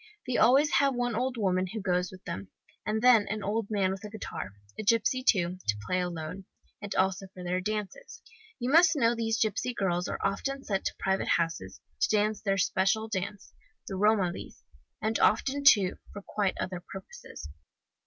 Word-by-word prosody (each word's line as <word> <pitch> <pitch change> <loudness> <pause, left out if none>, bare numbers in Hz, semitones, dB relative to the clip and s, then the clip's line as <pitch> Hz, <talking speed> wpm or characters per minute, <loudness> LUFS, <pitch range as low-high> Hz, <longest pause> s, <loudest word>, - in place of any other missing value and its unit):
They 255 -1 -2
always 280 +6 +5
have 275 -2 +2
one 245 -1 -1
old 250 +3 -1
woman 185 -3 +1
who 215 +4 -5
goes 180 -2 0
with 185 0 -13
them, 195 - -5 0.4
and 220 +2 -1
then 240 -5 +6
an 210 0 -3
old 215 +1 -1
man 195 -3 +1
with 195 +2 -6
a 210 - -6
guitar, 200 - -6 0.2
a - - -5
gipsy 230 +4 +2
too, 180 -6 +2
to 110 -1 +1
play 185 - 0
alone, 180 +1 -4 0.4
and 205 -1 -5
also 190 0 +1
for 180 - -8
their 180 +1 -1
dances. 215 - -5 0.3
You 250 0 -2
must 330 +1 +6
know 235 -5 +3
these 225 -1 -1
gipsy 230 +3 0
girls 180 -3 0
are - - -3
often 275 +8 -2
sent 195 -2 -2
for - - -4
to - - -38
private 190 0 0
houses, 165 - -1 0.2
to - - +2
dance 210 0 0
their 195 -2 0
special 195 +4 +1
dance, 200 0 -5 0.3
the - - -5
Romalis, 200 -3 0 0.4
and 220 +1 0
often, 275 +6 +2
too, 205 -9 +5
for 205 - -9
quite 200 -2 -1
other 185 -1 -3
purposes. 180 - -10
205 Hz, 185 wpm, -29 LUFS, 185-230 Hz, 0.4 s, then